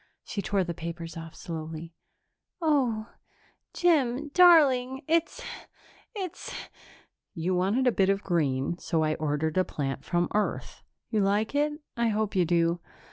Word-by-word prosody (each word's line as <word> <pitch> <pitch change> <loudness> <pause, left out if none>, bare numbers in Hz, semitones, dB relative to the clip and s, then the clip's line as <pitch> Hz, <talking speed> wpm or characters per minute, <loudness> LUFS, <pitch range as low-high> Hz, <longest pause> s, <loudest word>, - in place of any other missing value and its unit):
She 205 - -4
tore 195 -1 +1
the 170 -1 -3
papers 165 0 -6
off 165 -1 -8
slowly. 165 -1 -6 0.7
"Oh, 255 -9 +1 0.6
Jim, 295 -5 +2
darling, 280 -7 +5
it's 330 +1 +1 0.7
it's 375 -5 -5 0.5
" - - -28 0.3
"You 175 +2 -1
wanted 195 +8 +1
a 250 - +5
bit 195 -3 +2
of 195 0 +1
green, 150 -2 0
so 160 -1 0
I 155 0 +1
ordered 155 +2 -1
a - - +4
plant 135 -5 -4
from 175 0 +1
Earth. 210 0 -2 0.3
You 215 -3 +2
like 205 +4 +1
it? 295 +1 +1 0.2
I 235 0 +1
hope 215 -1 -1
you 180 -2 +3
do." 170 0 +2
195 Hz, 145 wpm, -28 LUFS, 165-255 Hz, 0.7 s, darling